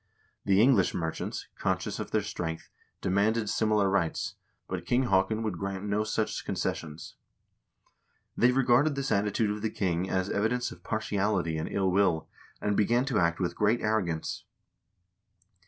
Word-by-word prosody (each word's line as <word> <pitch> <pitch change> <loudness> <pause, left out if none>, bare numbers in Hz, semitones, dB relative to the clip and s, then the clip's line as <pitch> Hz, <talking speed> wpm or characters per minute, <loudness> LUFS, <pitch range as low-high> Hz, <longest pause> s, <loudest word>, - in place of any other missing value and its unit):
The 100 -1 +4
English 115 -5 +4
merchants, 80 -1 -3
conscious - - -1
of - - -4
their 110 - +1
strength, 85 -5 -5 0.3
demanded 105 +4 +1
similar 110 -2 +2
rights, 95 -4 0 0.3
but 90 -2 -4
King 125 +2 +3
Haakon 110 +4 +2
would 105 -6 -3
grant 100 -1 -4
no 105 +1 0
such 110 0 -2
concessions. 80 +1 -4 1.2
They 120 +2 +4
regarded 135 +3 +3
this 135 -2 -2
attitude 105 +1 +1
of 105 0 -4
the 110 - 0
king 90 -2 -1
as 95 0 0
evidence 120 +4 0
of - - -12
partiality 100 -5 0
and 80 - -3
ill 95 -2 +1
will, 90 -4 +2 0.3
and 105 0 0
began 120 +5 +2
to 130 -6 +1
act 85 -1 +1
with 90 -2 -1
great 105 +3 +2
arrogance. 100 -7 -1
100 Hz, 150 wpm, -29 LUFS, 95-110 Hz, 1.2 s, The